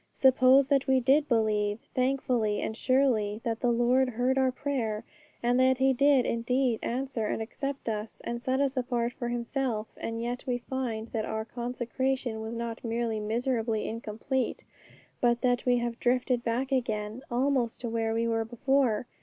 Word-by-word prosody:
Suppose 260 +1 +6
that 275 -1 +2
we 265 -1 +4
did 275 +4 +3
believe, 210 -3 +1 0.2
thankfully 255 -5 +1
and 220 - -3
surely, 230 -5 +2
that 230 -2 -2
the 245 - +2
Lord 245 +2 +3
heard 250 +2 +1
our 265 -1 +3
prayer, 240 -6 -2 0.4
and 245 +1 +3
that 260 0 +4
He 265 +1 +3
did 275 0 +4
indeed 240 0 +1
answer 250 -3 -2
and - - -2
accept 275 +5 -5
us, 215 0 -4
and 235 0 -4
set 260 +1 0
us 280 -1 +1
apart 245 -2 -1
for 240 - -4
Himself; 240 -2 -2
and 230 0 -4
yet 240 +1 -3
we 245 -1 +1
find 240 -3 -4
that 220 -2 -2
our 220 0 -3
consecration 245 0 -2
was 220 +1 -5
not 230 -1 -5
merely 230 -1 -1
miserably 225 0 -1
incomplete, 230 +4 -3 0.6
but 240 -1 +3
that 245 -1 +1
we 245 0 +4
have 240 -1 -3
drifted 250 0 +1
back 250 +4 -1
again 220 -3 -1
almost 250 -1 0
to 245 - -3
where 225 -1 -1
we 230 0 +1
were 225 -1 +1
before. 245 0 +1
240 Hz, 170 wpm, -29 LUFS, 225-260 Hz, 0.6 s, Suppose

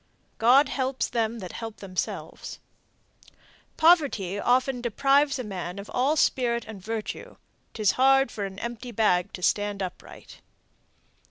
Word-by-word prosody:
God 255 +6 +6
helps 260 -1 -1
them 230 0 -1
that 185 - -7
help 225 -2 -7
themselves. 185 -2 -5 1.2
Poverty 285 - +3
often 250 +2 +1
deprives 275 +4 +2
a 255 - -4
man 185 -3 -6
of 200 0 -8
all 270 +5 +2
spirit 240 -5 +1
and 215 -4 -9
virtue, 220 0 -5 0.4
'Tis 215 -4 +3
hard 270 -1 +4
for 205 - -4
an 190 -1 -8
empty 235 +2 -6
bag 200 -5 +2
to 180 - -8
stand 205 0 0
upright. 180 - -10
230 Hz, 135 wpm, -26 LUFS, 200-260 Hz, 1.2 s, God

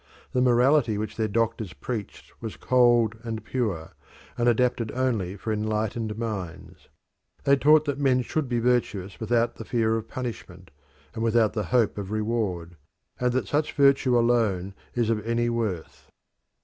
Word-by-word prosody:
The 125 - +2
morality 125 -1 +3
which 110 +1 -4
their 110 -1 0
doctors 110 -4 -1
preached 110 -6 -6
was 110 -2 -6
cold 120 -3 +3
and 110 -2 -5
pure, 100 -11 -2 0.4
and 120 0 +2
adapted 120 -1 +1
only 115 -8 -1
for 110 +3 -3
enlightened 110 +1 -2
minds. 105 -7 -6 0.5
They 140 0 +5
taught 150 +2 +5
that 145 -2 -2
men 130 -3 +2
should 140 +2 -2
be 120 - 0
virtuous 115 -6 0
without 115 +1 0
the - - -6
fear 110 -1 +1
of 115 0 -6
punishment 100 - -7 0.4
and 110 - -5
without 115 -2 +3
the 105 -3 -2
hope 115 -1 +1
of 100 -2 -5
reward, 105 -6 -2 0.4
and 125 0 +1
that 130 - -1
such 150 +1 0
virtue 140 -3 +4
alone 110 -6 +1 0.2
is 115 -2 +1
of 105 -2 -1
any 115 +1 0
worth. 90 - -4
115 Hz, 155 wpm, -26 LUFS, 105-125 Hz, 0.5 s, They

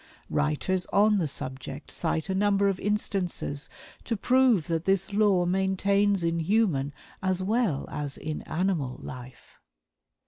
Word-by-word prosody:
Writers 155 +5 0
on 210 0 +4
the 165 - 0
subject 135 +1 -6
cite 160 -1 -1
a 190 - -1
number 200 0 +3
of 195 -2 0
instances 195 -7 -1 0.3
to 230 - -2
prove 250 - +3
that 165 -1 -2
this 195 +1 +1
law 200 -4 +3
maintains 195 +1 +2
in 165 0 0
human 165 -6 +1 0.3
as 190 -1 0
well 210 - 0
is 145 -1 -4
in 155 0 -4
animal 160 -7 -1
life. 125 -1 -10
185 Hz, 135 wpm, -27 LUFS, 155-200 Hz, 0.3 s, on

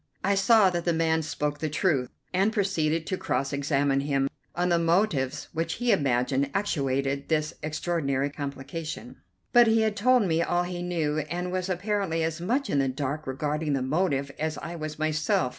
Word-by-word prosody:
I 200 - +3
saw 200 0 +5
that 175 -1 -2
the 170 - +1
man 160 0 +2
spoke 150 -1 -2
the 155 - -1
truth, 145 -5 +1 0.2
and 195 +4 +3
proceeded 165 -6 0
to 185 - -2
cross 140 -5 -1
examine 140 -1 +1
him 140 -1 0 0.3
on 180 +1 +1
the 170 -1 +3
motives 165 -6 +1
which 165 0 -1
he 245 0 +1
imagined 135 - +1
actuated 140 -7 0
this 155 -1 +1
extraordinary 150 -3 -1
complication; 145 +3 -6 0.4
but 240 -1 +7
he 225 0 +4
had 220 -1 +1
told 250 +3 +4
me 165 -3 +1
all 175 +1 +1
he 175 0 -4
knew, 160 -4 -1
and 180 +2 -3
was 185 0 -2
apparently 185 -3 -1
as 160 +1 -2
much 255 +10 0
in 140 - +1
the 135 - +2
dark 140 +3 -3
regarding 150 +3 -1
the 135 -2 0
motive 140 -1 0
as 155 0 -2
I 170 - -6
was 155 -2 -5
myself. 155 -4 +1
160 Hz, 180 wpm, -27 LUFS, 140-180 Hz, 0.4 s, but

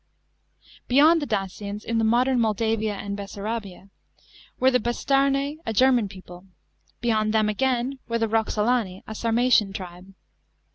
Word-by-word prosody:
Beyond 310 +6 +5
the 290 - -3
Dacians, 205 +1 -4
in 230 0 -1
the - - +1
modern 245 +3 +2
Moldavia 220 -1 0
and 200 0 -5
Bessarabia, 200 -1 -6 0.7
were 260 +1 +4
the 250 - +3
Bastarnse, 275 +5 0
a 225 - -3
German 245 -1 +3
people; 185 -1 -13 0.5
beyond 220 -2 +1
them 215 -1 +3
again 255 +4 -1
were 230 - -1
the 225 -1 0
Eoxolani, 220 -2 0
a 220 - -7
Sarmatian 230 -2 +2
tribe. 185 +1 -9
225 Hz, 135 wpm, -24 LUFS, 205-250 Hz, 0.7 s, Beyond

